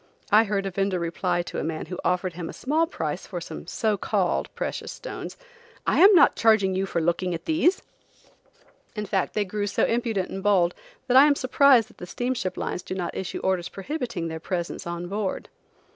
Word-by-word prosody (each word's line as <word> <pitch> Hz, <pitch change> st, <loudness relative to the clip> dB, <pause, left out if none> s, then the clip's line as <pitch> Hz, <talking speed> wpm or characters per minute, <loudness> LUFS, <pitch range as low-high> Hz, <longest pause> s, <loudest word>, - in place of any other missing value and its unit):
I 215 Hz, +2 st, +6 dB
heard 200 Hz, -1 st, -1 dB
a 195 Hz, -, -2 dB
vender 195 Hz, 0 st, 0 dB
reply 175 Hz, +1 st, -1 dB
to -, -, -5 dB
a -, -, -2 dB
man 160 Hz, -1 st, -3 dB
who 180 Hz, -, -7 dB
offered 180 Hz, 0 st, 0 dB
him 170 Hz, -1 st, -6 dB
a -, -, -7 dB
small 315 Hz, +5 st, 0 dB
price -, -, -4 dB
for -, -, -5 dB
some -, -, -8 dB
so 215 Hz, -3 st, 0 dB
called -, -, 0 dB
precious -, -, -4 dB
stones: -, -, -7 dB, 0.5 s
"I -, -, +2 dB
am 390 Hz, +2 st, +8 dB
not 340 Hz, -, +6 dB
charging 215 Hz, -4 st, +3 dB
you 190 Hz, +1 st, -1 dB
for 170 Hz, -, -1 dB
looking 175 Hz, +2 st, 0 dB
at 165 Hz, -, -8 dB
these." 335 Hz, +3 st, +2 dB, 1.1 s
In 210 Hz, -1 st, -3 dB
fact 190 Hz, -2 st, -1 dB
they 210 Hz, -1 st, +1 dB
grew 205 Hz, +2 st, -3 dB
so -, -, +1 dB
impudent 230 Hz, -5 st, -1 dB
and 195 Hz, -, -5 dB
bold, 190 Hz, -4 st, +3 dB, 0.3 s
that 255 Hz, 0 st, +4 dB
I 280 Hz, +2 st, +9 dB
am 290 Hz, -, +4 dB
surprised 255 Hz, -3 st, +4 dB
that -, -, -21 dB
the 180 Hz, -, -7 dB
steamship 245 Hz, -4 st, -2 dB
lines -, -, -3 dB
do 185 Hz, -, -6 dB
not 175 Hz, -2 st, -4 dB
issue 190 Hz, -, -4 dB
orders 185 Hz, -2 st, 0 dB
prohibiting 235 Hz, -, -4 dB
their 160 Hz, 0 st, -5 dB
presence 170 Hz, 0 st, -4 dB
on 170 Hz, 0 st, -4 dB
board. 200 Hz, 0 st, -3 dB
195 Hz, 205 wpm, -25 LUFS, 180-235 Hz, 1.1 s, I